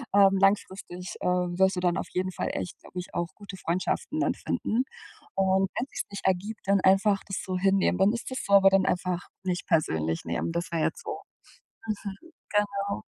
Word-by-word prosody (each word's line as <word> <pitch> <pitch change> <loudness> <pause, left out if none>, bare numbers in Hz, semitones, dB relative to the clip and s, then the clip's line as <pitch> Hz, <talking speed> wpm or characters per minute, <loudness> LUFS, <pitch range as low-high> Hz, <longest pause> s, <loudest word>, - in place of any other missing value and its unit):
ähm, 195 -1 +6
langfristig, 190 -2 0
ähm, 180 -1 0
wirst 190 0 +4
du - - -1
dann 175 -1 +1
auf - - -3
jeden 185 +1 0
Fall - - -2
echt, 180 - -4
glaube - - -13
ich, 180 - -8
auch 175 0 -1
gute 200 -2 -9
Freundschaften 185 - -1
dann - - +2
finden 235 +4 -1 0.5
und 190 0 +3
wenn 250 - -1
sich's - - -4
nicht 200 -1 -7
ergibt, 195 +4 0
dann 200 -1 +4
einfach 195 +1 +4
das 195 - -3
so 185 -1 -2
hinnehmen, 195 0 +3
dann 195 +2 +5
ist 235 - -4
das 260 - -2
so, 200 - 0
aber 195 -1 +8
dann 195 -1 +3
einfach 180 0 -1 0.2
nicht 180 -1 -2
persönlich 80 - +1
nehmen. 85 - -1
Das 170 +1 -3
wäre 165 -2 0
jetzt 470 - -1
so - - -5 0.7
mhm, 205 -2 -4 0.3
genau. 200 -1 0
190 Hz, 195 wpm, -28 LUFS, 180-200 Hz, 0.7 s, aber